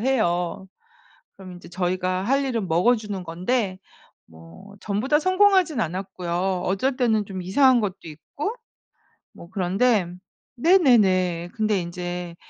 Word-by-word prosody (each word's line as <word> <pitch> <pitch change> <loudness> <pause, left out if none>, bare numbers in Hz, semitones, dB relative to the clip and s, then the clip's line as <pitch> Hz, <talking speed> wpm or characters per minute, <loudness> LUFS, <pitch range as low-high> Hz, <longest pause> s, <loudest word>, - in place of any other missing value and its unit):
해요. 190 -8 0 0.7
그럼 190 -2 -11
인제 175 -1 -12
저희가 185 +1 -2
할 275 +5 +1
일은 235 -7 -2
먹어주는 205 +3 +1
건데 185 +4 -2 0.5
뭐 80 - -15
전부 210 +3 -2
다 295 - +4
성공하진 370 - +3
않았고요. 180 0 -3
어쩔 250 +8 0
때는 220 -5 +1
좀 190 -2 -6
이상한 250 +7 +4
것도 200 -3 -3
있고 170 - -6 0.8
뭐 170 - -13
그런데 195 +2 +1 0.5
네네네. 205 - +3
근데 215 -3 0
인제 175 0 -6
195 Hz, 255 characters per minute, -23 LUFS, 180-245 Hz, 0.8 s, 다